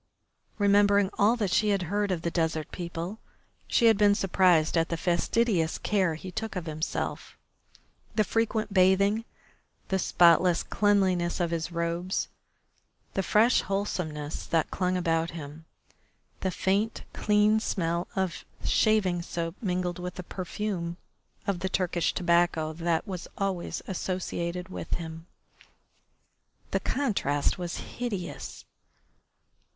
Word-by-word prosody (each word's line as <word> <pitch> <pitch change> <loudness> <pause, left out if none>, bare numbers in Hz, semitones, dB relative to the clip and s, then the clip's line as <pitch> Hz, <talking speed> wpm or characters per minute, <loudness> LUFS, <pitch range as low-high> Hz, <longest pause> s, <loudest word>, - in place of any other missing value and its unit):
Remembering 200 -1 +4
all 210 +4 +5
that 210 -6 -1
she 215 +2 +3
had 200 -2 +1
heard 205 +3 -1
of 175 -3 -2
the 170 - -1
desert 160 -2 -1
people 175 +4 -5 0.5
she 235 - +3
had 225 -3 +5
been 205 -1 +5
surprised 180 -5 +3
at 165 -1 +2
the 170 - -1
fastidious 175 +1 +1
care 190 -6 +1
he 185 +4 -8
took 220 +2 -4
of 180 -3 -3
himself, 155 0 -4 0.8
the 215 - +4
frequent 220 0 -1
bathing, 200 +4 +4 0.6
the 190 - +1
spotless 175 0 +4
cleanliness 190 -4 +2
of 170 -2 0
his 165 +1 -2
robes, 170 +2 -2 0.8
the 195 - +1
fresh 215 +6 +4
wholesomeness 170 -6 -3
that 165 -2 +1
clung 185 0 0
about 165 -2 +1
him, 150 +1 -9 0.7
the 190 - -1
faint, 200 +5 0
clean 210 +1 +3
smell 170 -4 -1
of 190 -3 -1 0.2
shaving 195 -5 +3
soap 170 -1 -4
mingling 180 -3 -1
with 180 0 -5
the 180 - -6
perfume 180 -1 -4 0.5
of 195 -3 -1
the 190 +1 -2
Turkish 180 -3 0
tobacco 170 -3 +2
that 165 0 0
was 185 -3 -5
always 195 -3 -2
associated 180 -1 -3
with 185 - -4
him. 165 0 -7 1.4
The - - +1
contrast 195 - 0
was 175 -1 -3
hideous. 205 -8 -5
180 Hz, 125 wpm, -28 LUFS, 170-200 Hz, 1.4 s, all